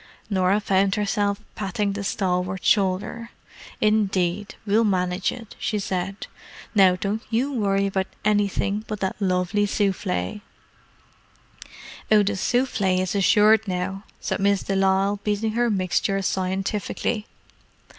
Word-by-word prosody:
Norah 190 +1 +3
found 195 -1 +2
herself 205 -1 0
patting 200 0 -2
the 200 0 -4
stalwart 185 -1 -1
shoulder. 205 +3 +1 0.5
"Indeed, 200 -3 +1
we'll 215 +2 +3
manage 180 -2 0
it," 230 -4 -10
she 215 0 -1
said. 195 0 -3 0.5
"Now, 190 -4 +5
don't 200 +4 -2
you 255 +5 0
worry 200 -4 +1
about 190 -1 -1 0.2
anything 205 0 +1
but 210 -2 -4
that 190 - -1
lovely 185 +2 +1
souffle." 195 - -1 1.7
"Oh, 210 -1 +6
the 205 +1 -1
souffle 200 -3 +1
is 185 0 -1
assured 210 +2 +4
now," 190 +2 -3 0.2
said - - -2
Miss 200 0 +2
de 195 - -2
Lisle, 195 +1 +2
beating 210 +1 0
her 240 +2 +1
mixture 195 0 0
scientifically. 195 +4 -2
200 Hz, 125 wpm, -24 LUFS, 190-210 Hz, 1.7 s, Oh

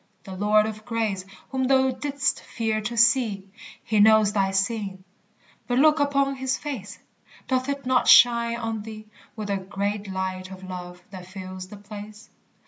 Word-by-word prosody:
the 190 - -8
Lord 210 +2 +3
of 215 0 -6
grace 220 -5 -2 0.3
Whom 260 -1 0
thou 265 0 +3
didst 280 +1 -1
fear 220 -2 -2
to 235 +2 -4
see 230 -5 +3 0.4
He 215 -1 0
knows 215 -1 +5
thy 195 -2 +2
sin 195 -1 -2 0.6
but 245 - 0
look 305 +2 +5
upon 275 -1 +1
his 260 0 -1
face! 225 -9 -6 0.5
Doth 255 +1 0
it 280 -1 -3
not 255 0 +2
shine 235 -1 +6
on 225 -2 -3
thee 215 0 -9 0.3
With 210 -2 -4
a 200 - +1
great 200 +2 -3
light 185 0 -4
of 190 0 -10
love 180 -1 -8
that 185 -2 -9
fills 185 -1 -8
the 210 - -11
place? 210 +1 -11
215 Hz, 165 wpm, -25 LUFS, 195-245 Hz, 0.6 s, shine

